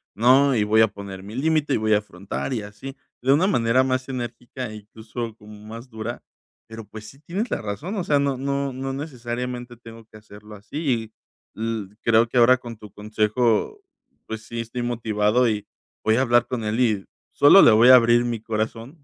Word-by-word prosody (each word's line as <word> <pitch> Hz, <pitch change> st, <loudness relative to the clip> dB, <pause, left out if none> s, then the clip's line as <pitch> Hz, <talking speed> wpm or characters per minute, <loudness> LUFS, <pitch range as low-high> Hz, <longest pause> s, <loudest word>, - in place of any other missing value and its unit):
no, 130 Hz, +4 st, +4 dB
y 105 Hz, -, +2 dB
voy 110 Hz, +1 st, +3 dB
a 110 Hz, -, +6 dB
poner 100 Hz, -2 st, -9 dB
mi 105 Hz, +3 st, -9 dB
límite, 150 Hz, 0 st, +1 dB
y -, -, +2 dB
voy 110 Hz, 0 st, +1 dB
a 105 Hz, -, +4 dB
afrontar, 100 Hz, +5 st, -6 dB
y 115 Hz, -, -2 dB
así. 130 Hz, +7 st, -10 dB, 0.2 s
De 135 Hz, +2 st, +3 dB
una 170 Hz, +6 st, +3 dB
manera 120 Hz, -, +2 dB
más 130 Hz, 0 st, -1 dB
enérgica, 120 Hz, -2 st, -6 dB
incluso, 110 Hz, +2 st, -8 dB
como 105 Hz, -1 st, -14 dB
más 115 Hz, +3 st, -9 dB
dura. 110 Hz, +1 st, -6 dB, 0.4 s
Pero 110 Hz, -1 st, -9 dB
pues, 110 Hz, 0 st, -11 dB
sí 135 Hz, -, -14 dB
tienes 190 Hz, -, -4 dB
la -, -, -2 dB
razón. 145 Hz, -, -5 dB
O 180 Hz, -, -1 dB
sea, 145 Hz, -3 st, +2 dB
no 140 Hz, -1 st, 0 dB
no 140 Hz, 0 st, -2 dB
no 135 Hz, +1 st, -4 dB
necesariamente, 125 Hz, -3 st, -5 dB
tengo 115 Hz, -1 st, -13 dB
que 110 Hz, -, -16 dB
hacerlo 105 Hz, 0 st, -14 dB
así. 115 Hz, 0 st, -3 dB, 0.4 s
Y 110 Hz, -, -9 dB
l 110 Hz, -3 st, -4 dB
creo, 115 Hz, 0 st, +3 dB
que 125 Hz, -, -3 dB
ahora 125 Hz, +2 st, +6 dB
con 120 Hz, -3 st, -10 dB
tu 105 Hz, -2 st, -13 dB
consejo, 110 Hz, -, 0 dB, 0.5 s
pues 110 Hz, 0 st, -6 dB
sí, 115 Hz, 0 st, -7 dB
estoy 115 Hz, +2 st, -5 dB
motivado, 115 Hz, 0 st, +1 dB
y 105 Hz, -2 st, -2 dB, 0.4 s
voy 110 Hz, -, +3 dB
a 130 Hz, -, +2 dB
hablar 120 Hz, -2 st, +3 dB
con 125 Hz, -3 st, -4 dB
él, 110 Hz, +3 st, -2 dB
y 110 Hz, -6 st, +1 dB, 0.3 s
sólo 145 Hz, +7 st, +7 dB
le -, -, +8 dB
voy 115 Hz, +3 st, +6 dB
a 130 Hz, -, +11 dB
abrir 120 Hz, 0 st, +5 dB
mi 120 Hz, -2 st, -2 dB
corazón. 115 Hz, +6 st, -4 dB
115 Hz, 200 wpm, -23 LUFS, 110-130 Hz, 0.5 s, a